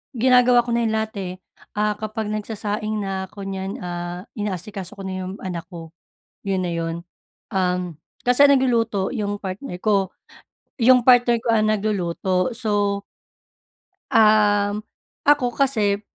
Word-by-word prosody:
ginagawa 250 0 +5
ko 240 - -3
na 235 - +1
‘yan 225 - +1
lahat, 220 0 -2
eh. 185 -2 -4 0.4
Ah, 210 0 +2
kapag 215 0 -4
nagsasaing 215 0 -3
na 190 -1 -3
ko 200 -2 -8
niyan, 195 0 -4
ah, 175 +1 -5
inaasikaso 195 -2 -5
ko 195 - -7
na 190 - -4
’yong 185 +1 -5
anak 175 -3 -4
ko. 165 -2 -9 0.6
'Yun 190 -1 +1
na 175 - -2
'yun. 165 0 -2 0.6
Um, 180 -3 -1 0.3
kasi 250 +3 +4
ang 280 - +6
nagluluto 230 -6 +1
'yung 205 -4 -2
partner 190 0 -6
ko. 195 -3 +2 0.7
'Yung 250 +1 +6
partner 245 -2 +6
ko - - -6
ang 215 -1 +3
nagluluto. 190 -2 0
So, 205 -3 0 1.1
um, 210 -1 +4 0.5
ako 265 -5 +4
kasi, 215 -7 +1
205 Hz, 140 wpm, -22 LUFS, 190-225 Hz, 1.1 s, ang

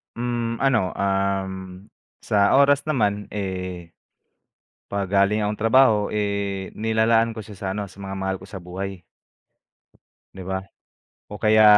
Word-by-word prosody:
Hmm, 120 -1 -2
ano, 130 -9 +2
uhm, 95 -1 -2 0.3
sa 100 -1 +3
oras 140 +1 +5
naman, 105 -9 0
eh, 90 -4 -4 1.0
pag 100 -2 -3
galing 100 +2 +3
akong 105 0 -1
trabaho 115 +1 +5 0.2
eh, 100 -2 -1
nilalaan 115 +1 +2
ko 110 - -6
siya 105 -1 -11
sa 95 - -5
ano, 100 -1 -4
sa 95 - -18
mga 95 -1 -6
mahal 95 0 -2
ko 95 - -13
sa 95 -1 -9
buhay. 95 +1 -6 1.3
Di 95 - -8
ba? 95 +1 -4 0.7
O 105 - -7
kaya 110 0 +5
100 Hz, 140 wpm, -23 LUFS, 95-110 Hz, 1.3 s, oras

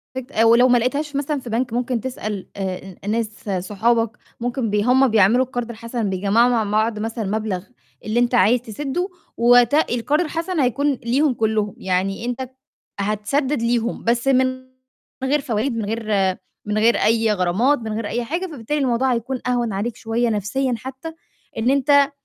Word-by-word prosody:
فت 260 -2 -5
ولو 235 +2 +6
ما 245 -1 +5
لقيتهاش 280 +5 -1
مثلًا 285 +1 -1
في 245 - -9
بَنْك 235 +1 -1
ممكن 245 0 -1
تسأل 215 -6 -5
آآ 190 -1 -5
ن - - +1
ناس 215 -2 -3 0.2
صُحَابَك 230 +2 +1 0.2
ممكن 240 -1 -2
بي 205 0 +1
هُم 260 +3 +4
بيعملوا 225 +3 +4
القَرْض 245 -2 -4
الحَسَن 230 -1 -4
بيجّمعوا 200 +6 +3
مع 235 -3 +2
بعض 215 +1 0
مثلًا، 225 +1 -3
مبلغ 205 -2 -2 0.4
اللي 215 +2 0
أنت 245 0 +2
عايز 235 +2 +4
تسِدّه 280 - -3 0.3
ووقتها 245 +5 +5
القَرْض 285 +7 +1
الحَسَن 330 +2 -3
هيكون 280 +2 +2
ليهم 260 +3 +1
كُلّهم. 215 -2 -1
يعني 190 +4 -1
أنت 245 +1 -3
ب 260 - -5 0.5
هتسدِّد 225 +7 0
ليهم 235 0 -1
بس 235 +2 +1
من 260 -1 +4 0.8
من 265 - 0
غير 295 +1 +2
فوايد، 240 -1 -1
من 220 - -2
غير 225 +2 -3 0.6
من 210 0 -1
غير 225 +2 +4
أي 225 0 +2
غرامات، 205 +10 +2
من 220 -2 -5
غير 220 0 -3
أي 240 +3 -2
حاجة. 335 +10 -3
فبالتالي 295 -2 -3
الموضوع 255 -1 +1
هيكون 245 +3 -3
أهوَن 240 -3 0
عليك 215 +4 -2
شوية 230 0 -1
نَفْسيًا 225 +5 -1
حتّى 265 +7 -8 0.4
إن 225 +3 +1
أنت 280 +1 +4
235 Hz, 175 wpm, -21 LUFS, 215-260 Hz, 0.8 s, ولو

